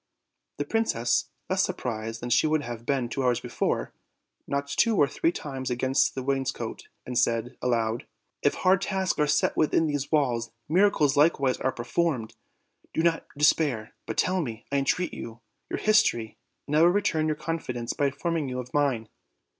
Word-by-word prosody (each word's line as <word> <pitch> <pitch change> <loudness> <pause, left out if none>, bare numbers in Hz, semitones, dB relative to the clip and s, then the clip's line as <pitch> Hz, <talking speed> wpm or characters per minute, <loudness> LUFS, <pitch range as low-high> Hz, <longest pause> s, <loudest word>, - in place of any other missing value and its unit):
The 145 - -2
princess, 145 - +1 0.2
less - - +1
surprised 115 -1 -3
than 120 - -3
she 155 - +4
would 155 -1 +1
have 120 -1 -7
been 135 -4 +1
two 135 +3 -3
hours 125 -2 +2
before, - - -2 0.5
knocked 140 0 -2
two 230 -3 +4
or 145 - +5
three 165 - 0
times 135 -5 -5
against 130 +2 +1
the 130 - -3
wainscot, 135 -1 -2 0.2
and 125 - -5
said 120 0 +1
aloud: 115 -2 0 0.3
"If - - +2
hard 185 0 +3
tasks 190 -3 -1
are 150 - +3
set 150 0 +2
within 160 +1 +2
these 145 -2 -2
walls, 125 -6 +1 0.2
miracles 160 -5 +3
likewise 145 -4 +3
are 130 - 0
performed: 125 -1 -1 0.6
do 160 - +1
not 170 -1 +1
de 150 - +4
spair. 135 -8 +2 0.2
But - - -4
tell 185 0 +2
me, 115 -6 -6
I 140 - +2
entreat 160 +5 0
you, 115 +1 -8 0.3
your - - -2
history, 210 - +2 0.3
and 150 - -2
I 155 - +5
will 170 - +7
return 175 -4 +2
your 155 - 0
confidence 125 -8 -3
by 145 - +1
informing 160 +1 -2
you 125 - -4
of 125 0 -8
mine." 135 -7 +1
140 Hz, 180 wpm, -27 LUFS, 120-160 Hz, 0.6 s, will